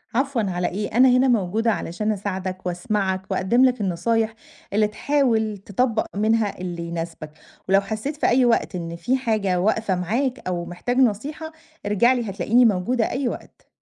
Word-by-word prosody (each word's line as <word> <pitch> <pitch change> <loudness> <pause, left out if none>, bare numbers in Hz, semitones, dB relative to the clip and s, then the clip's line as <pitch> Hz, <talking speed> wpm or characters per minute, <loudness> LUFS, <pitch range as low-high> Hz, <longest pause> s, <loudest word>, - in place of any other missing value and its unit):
عفوًا 270 -1 +1
على 180 -1 -1
إيه، 205 +3 -3
أنا 260 +1 +7
هنا 255 +1 +4
موجودة 225 -1 +1
علشان 210 +2 -2
أساعدك 190 -2 -4
وأسمَعك 190 +2 -1
وأقدِّم 230 +7 +3
لك 250 -3 +1
النصايح 220 +5 0 0.4
اللي 210 +1 +3
تحاول 225 -3 0
تطبّق 220 +4 -1
منها 215 0 +1
اللي 175 -2 -4
يناسبك، 165 -2 -6 0.4
ولو 195 +1 +5
حسّيت 220 +8 -4
في - - +1
أي 250 +1 +4
وقت 235 -4 +1
إن 170 -1 -5
في 245 +11 0
حاجة 215 -8 0
واقفة 215 0 +1
معاك 235 +9 -2
أو 175 -1 -2
محتاج 175 +8 -3
نصيحة، 275 +7 0 0.3
ارجع 210 +5 +3
لي 240 -4 -2
هتلاقيني 215 +6 +3
موجودة 220 +3 +1
أي 265 0 -1
وقت. - - -8
215 Hz, 160 wpm, -23 LUFS, 185-245 Hz, 0.4 s, أنا